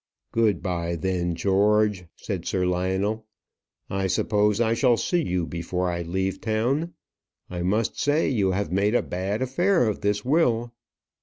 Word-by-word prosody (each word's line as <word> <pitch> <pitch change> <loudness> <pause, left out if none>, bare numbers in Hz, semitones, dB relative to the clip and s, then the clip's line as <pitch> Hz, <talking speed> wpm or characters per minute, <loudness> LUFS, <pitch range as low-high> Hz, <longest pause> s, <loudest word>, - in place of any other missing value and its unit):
"Good 110 -6 +1
bye, 85 -2 -2
then, 90 0 -1
George," 100 +2 +2
said - - -5
Sir 90 -1 0
Lionel. 95 +5 -1 0.6
"I 95 0 -1
suppose 105 +2 +1
I 115 -1 +2
shall 120 0 +3
see 175 +7 +1
you 90 - -1
before 90 +2 -2
I 85 0 -3
leave 95 +3 -2
town. 125 +10 -1 0.6
I 90 -1 -4
must 105 +5 0
say, 145 +2 +2
you 105 -8 +1
have 95 -3 -1
made 100 +4 +2
a - - +3
bad 95 +6 -2
affair 175 - +2
of 105 - -2
this 105 +1 0
will." 120 -5 +2
100 Hz, 155 wpm, -25 LUFS, 90-115 Hz, 0.6 s, shall